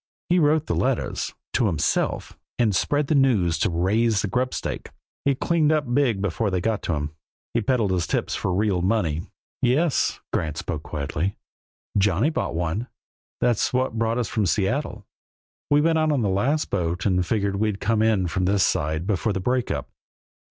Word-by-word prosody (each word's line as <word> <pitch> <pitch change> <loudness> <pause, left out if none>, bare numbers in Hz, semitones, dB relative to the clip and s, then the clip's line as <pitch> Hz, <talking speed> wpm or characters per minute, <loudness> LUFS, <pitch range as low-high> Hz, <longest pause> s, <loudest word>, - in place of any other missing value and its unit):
He 180 +1 +4
wrote 155 0 +3
the - - -1
letters 130 -1 -1 0.2
to 120 - +2
himself 80 -7 -1 0.2
and 110 -5 +2
spread 145 +9 +1
the 145 - 0
news 125 - +3
just 80 - -3
to - - +3
raise 100 +5 +1
a - - 0
grubstake. 125 +6 -2 0.4
He 140 -1 +3
cleaned 160 +1 +2
up 145 -6 0
big 120 -8 +2
before 105 +3 0
they 95 -1 0
got 110 +1 -2
onto - - +2 0.2
him. - - -30 0.4
He 115 - +1
peddled 115 -3 +1
his 90 -3 0
tips - - -1
for - - -1
real 95 -1 +1
money." 90 -6 +1 0.4
"Yes!" 140 +5 +2
Grant 80 -1 -1
spoke 75 -2 -4
quietly. 75 +6 -3 0.6
"Johnny 100 - +2
bought 155 - -2
one. 90 +8 -2 0.5
That's 120 -1 +2
what 125 -3 0
brought 115 +1 +1
us 120 -3 0
from 105 -3 0
Seattle. 105 - -1 0.6
We 145 0 +4
went 160 +1 +3
out 155 -1 +2
on 135 -5 +1
the 100 - +1
last 130 +11 0
boat 90 -2 -1
and 90 -3 +2
figured 100 0 0
we'd 105 -1 0
come 110 +1 +1
in 110 -4 +2
from 90 +2 -1
this 100 0 +3
side 80 +3 -1
before 105 +1 0
the 95 - -2
break 125 +5 0
up. - - -3
105 Hz, 185 wpm, -24 LUFS, 90-130 Hz, 0.6 s, He